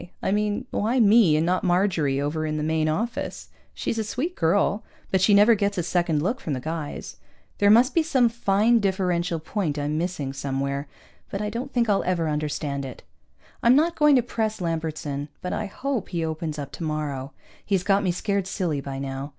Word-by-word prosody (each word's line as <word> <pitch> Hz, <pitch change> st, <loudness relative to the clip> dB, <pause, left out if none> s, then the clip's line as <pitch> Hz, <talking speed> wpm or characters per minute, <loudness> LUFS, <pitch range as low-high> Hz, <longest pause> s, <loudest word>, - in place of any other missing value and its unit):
I -, -, +1 dB
mean, 210 Hz, +4 st, 0 dB
why 235 Hz, +5 st, +1 dB
me 210 Hz, -7 st, +6 dB
and 160 Hz, -, +1 dB
not 180 Hz, +1 st, +1 dB
Marjorie 175 Hz, -7 st, +1 dB
over 150 Hz, +2 st, -1 dB
in 155 Hz, -1 st, -2 dB
the 150 Hz, -, -2 dB
Main 155 Hz, 0 st, +1 dB
Office? 225 Hz, +10 st, -3 dB, 0.2 s
She's 225 Hz, -, -3 dB
a -, -, 0 dB
sweet 290 Hz, -, -3 dB
girl, 200 Hz, +5 st, +1 dB, 0.3 s
but 190 Hz, -, +2 dB
she 195 Hz, -, +4 dB
never 210 Hz, +3 st, +7 dB
gets 200 Hz, -2 st, 0 dB
a 175 Hz, -, 0 dB
second 170 Hz, -3 st, 0 dB
look 230 Hz, +9 st, -1 dB
from 155 Hz, -, -3 dB
the 130 Hz, -, -2 dB
guys. 155 Hz, +1 st, -5 dB, 0.4 s
There 205 Hz, -, +5 dB
must 240 Hz, +6 st, +6 dB
be 335 Hz, -, +4 dB
some 275 Hz, -6 st, +3 dB
fine 230 Hz, 0 st, +2 dB
differential 180 Hz, -4 st, 0 dB
point 160 Hz, -2 st, -2 dB
I'm 150 Hz, +1 st, -1 dB
missing 165 Hz, -6 st, -3 dB
somewhere, 140 Hz, +1 st, -3 dB, 0.4 s
but 195 Hz, -, -4 dB
I 210 Hz, 0 st, -2 dB
don't 245 Hz, +5 st, -4 dB
think 240 Hz, -2 st, +1 dB
I'll 205 Hz, -2 st, +2 dB
ever 175 Hz, -3 st, 0 dB
understand 150 Hz, -2 st, -2 dB
it. 130 Hz, -2 st, -8 dB, 0.6 s
I'm 235 Hz, +2 st, +5 dB
not 325 Hz, +4 st, +3 dB
going 300 Hz, -2 st, +5 dB
to 250 Hz, -, +4 dB
press 220 Hz, -2 st, -2 dB
Lambertson, 160 Hz, -4 st, -3 dB
but 180 Hz, -, -4 dB
I 215 Hz, -, -2 dB
hope 255 Hz, +2 st, -3 dB
he 170 Hz, -3 st, -2 dB
opens 160 Hz, -1 st, -4 dB
up 140 Hz, -1 st, -6 dB
tomorrow. 150 Hz, -2 st, -4 dB, 0.3 s
He's 195 Hz, -3 st, 0 dB
got 195 Hz, +1 st, +3 dB
me 185 Hz, -, +1 dB
scared 200 Hz, +1 st, -1 dB
silly 170 Hz, -7 st, -2 dB
by 135 Hz, -1 st, -6 dB
now. 135 Hz, +1 st, -5 dB
180 Hz, 200 wpm, -25 LUFS, 155-210 Hz, 0.6 s, never